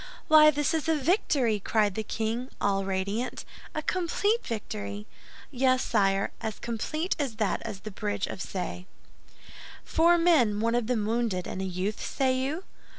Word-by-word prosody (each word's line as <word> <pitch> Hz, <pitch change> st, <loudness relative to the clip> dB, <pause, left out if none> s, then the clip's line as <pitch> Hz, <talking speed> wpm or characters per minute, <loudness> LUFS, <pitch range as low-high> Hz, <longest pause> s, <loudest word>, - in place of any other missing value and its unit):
"Why, 305 Hz, -1 st, +9 dB
this 295 Hz, +1 st, +1 dB
is 320 Hz, 0 st, -1 dB
a 320 Hz, -, +4 dB
victory!" 275 Hz, -, +1 dB
cried 210 Hz, 0 st, +1 dB
the 220 Hz, -, -2 dB
king, 225 Hz, +4 st, -3 dB
all 195 Hz, -1 st, +1 dB
radiant, 200 Hz, +6 st, -2 dB, 0.3 s
"a 310 Hz, -, -2 dB
complete 390 Hz, +7 st, 0 dB
victory!" 105 Hz, -, -5 dB, 0.5 s
"Yes, 255 Hz, -1 st, +2 dB
sire; 195 Hz, -1 st, +1 dB
as 220 Hz, -2 st, -3 dB
complete 310 Hz, -, -2 dB
as 270 Hz, -6 st, -2 dB
that 215 Hz, -3 st, 0 dB
of 195 Hz, -1 st, -7 dB
the 215 Hz, -, -6 dB
Bridge 205 Hz, -1 st, -2 dB
of -, -, -6 dB
Ce." 180 Hz, -1 st, -4 dB, 1.0 s
"Four 340 Hz, +2 st, +4 dB
men, 290 Hz, -12 st, +4 dB
one 230 Hz, +1 st, +1 dB
of 240 Hz, -2 st, 0 dB
them 230 Hz, -4 st, 0 dB
wounded, 220 Hz, -5 st, 0 dB
and 190 Hz, -, -4 dB
a -, -, -2 dB
youth, 190 Hz, +3 st, -3 dB
say 260 Hz, -1 st, +1 dB
you?" 280 Hz, +7 st, -2 dB
230 Hz, 160 wpm, -28 LUFS, 200-295 Hz, 1.0 s, Why